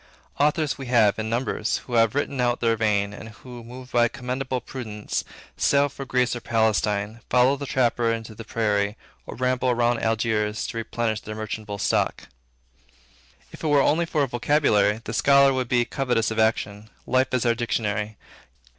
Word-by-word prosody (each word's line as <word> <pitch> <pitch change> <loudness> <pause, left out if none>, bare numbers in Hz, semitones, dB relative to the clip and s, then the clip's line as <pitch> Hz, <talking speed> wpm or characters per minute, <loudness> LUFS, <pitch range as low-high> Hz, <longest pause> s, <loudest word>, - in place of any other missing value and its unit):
Authors 150 0 +1
we 135 - -6
have, 110 -4 +3
in 110 0 -2
numbers, 115 -2 -1
who 125 - -8
have 115 0 +3
written 140 -2 -1
out 120 0 +1
their 115 -1 +2
vein, 105 -2 0
and 110 - -9
who, 120 +2 -11
moved 125 +2 -11
by 120 -1 +4
a - - 0
commendable 130 0 -3
prudence, 110 -4 -5 0.3
sail 145 0 +3
for 140 0 -8
Greece 125 -1 +1
or 120 - -6
Palestine, 110 -1 0
follow 125 +2 +4
the 140 0 -6
trapper 120 -3 +1
into 115 -1 -4
the 115 +2 -9
prairie, 105 -2 0 0.3
or - - -7
ramble 125 0 +1
round 120 0 +1
Algiers, 110 -1 0
to 115 - -5
replenish 115 -1 -2
their 110 - -7
merchantable 110 -1 -5
stock. - - -1 1.2
If - - -12
it - - 0
were 145 -1 +4
only 165 +4 +2
for 150 -3 +1
a - - 0
vocabulary, 120 -5 +2
the 115 - -6
scholar 140 +2 +5
would 130 -2 -2
be 120 -1 +2
covetous 120 -4 0
of 110 - -2
action. 110 -1 0 0.2
Life 130 +1 +1
is 125 - 0
our 120 - +4
dictionary. 110 -3 -2
120 Hz, 180 wpm, -24 LUFS, 110-130 Hz, 1.2 s, scholar